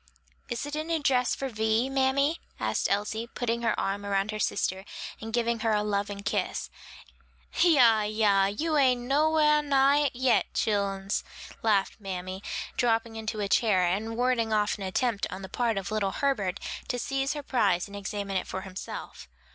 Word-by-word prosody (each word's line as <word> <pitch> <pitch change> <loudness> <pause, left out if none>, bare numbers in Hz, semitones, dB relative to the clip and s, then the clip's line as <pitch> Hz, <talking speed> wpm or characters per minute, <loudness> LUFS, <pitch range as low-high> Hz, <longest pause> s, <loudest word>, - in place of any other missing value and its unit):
"Is 240 +2 -3
it 290 +1 -5
a 310 - -1
new 330 +1 0
dress 255 -4 +2
for 270 - -3
Vi, 220 +1 +1
mammy?" 270 +4 +1 0.2
asked - - 0
Elsie, 210 +3 -1
putting 235 0 -2
her 235 - 0
arm 200 +1 -2
about 200 +1 0
her 215 - -4
sister 190 -2 -1 0.4
and 225 +1 -6
giving 235 0 0
her 225 -1 +1
a 210 0 +2
loving 200 -1 -2
kiss. 200 - -2 0.9
"Yah, 250 -10 +6
yah; 210 -2 +3
you 305 +11 -1
ain't 255 -3 +4
no 285 +5 +2
whar 300 -1 +4
nigh 285 0 +3
it 255 - -7
yet, 245 -5 +2
chillens," 200 -2 0 0.4
laughed 205 -2 +1
mammy, 185 -1 -5 0.4
dropping 230 -1 +1
into 220 -1 -4
a 200 - 0
chair, 200 -3 +3
and 215 +6 -1
warding 245 -2 +1
off 210 -1 +2
an - - -11
attempt 205 +3 0
on 190 +1 -7
the - - -5
part 230 0 0
of 195 +1 -3
little 205 -3 0
Herbert 210 -10 0 0.3
to 250 - -1
seize 270 +2 -1
her 295 -1 -5
prize 200 -10 +1
and 200 - -10
examine 200 -1 -3
it - - -3
for 190 - -4
himself. 190 -1 -8
220 Hz, 180 wpm, -28 LUFS, 200-260 Hz, 0.9 s, Yah